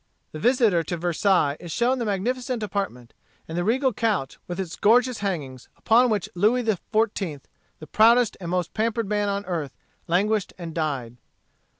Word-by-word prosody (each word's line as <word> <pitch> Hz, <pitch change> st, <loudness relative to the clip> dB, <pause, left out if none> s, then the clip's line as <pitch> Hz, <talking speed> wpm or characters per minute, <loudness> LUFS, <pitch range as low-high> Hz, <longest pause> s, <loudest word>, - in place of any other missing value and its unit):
The 155 Hz, -, -7 dB
visitor 230 Hz, -, +3 dB
to 170 Hz, +2 st, -4 dB
Versailles 175 Hz, -3 st, +1 dB
is 175 Hz, -, -8 dB
shown 245 Hz, +7 st, +1 dB
the 235 Hz, -, -2 dB
magnificent 240 Hz, +4 st, -2 dB
apartment, 195 Hz, -, -4 dB, 0.3 s
and 160 Hz, -, -6 dB
the 175 Hz, -, 0 dB
regal 255 Hz, +5 st, +1 dB
couch, 205 Hz, -12 st, -1 dB
with 175 Hz, +1 st, -5 dB
its 180 Hz, -3 st, -4 dB
gorgeous 245 Hz, +3 st, +3 dB
hangings, 145 Hz, -11 st, -4 dB
upon 240 Hz, +3 st, +4 dB
which 210 Hz, -3 st, 0 dB
Louis 220 Hz, +7 st, +2 dB
XIV., 205 Hz, -, -1 dB, 0.4 s
the 155 Hz, -, -10 dB
proudest 230 Hz, +7 st, +4 dB
and 170 Hz, -, -5 dB
most 180 Hz, -1 st, -1 dB
pampered 225 Hz, 0 st, -1 dB
man 205 Hz, 0 st, 0 dB
on 200 Hz, 0 st, -2 dB
earth, 165 Hz, -6 st, -4 dB, 0.3 s
languished 200 Hz, +4 st, +1 dB
and 170 Hz, -3 st, -7 dB
died. 135 Hz, -7 st, -3 dB
200 Hz, 165 wpm, -24 LUFS, 170-225 Hz, 0.4 s, upon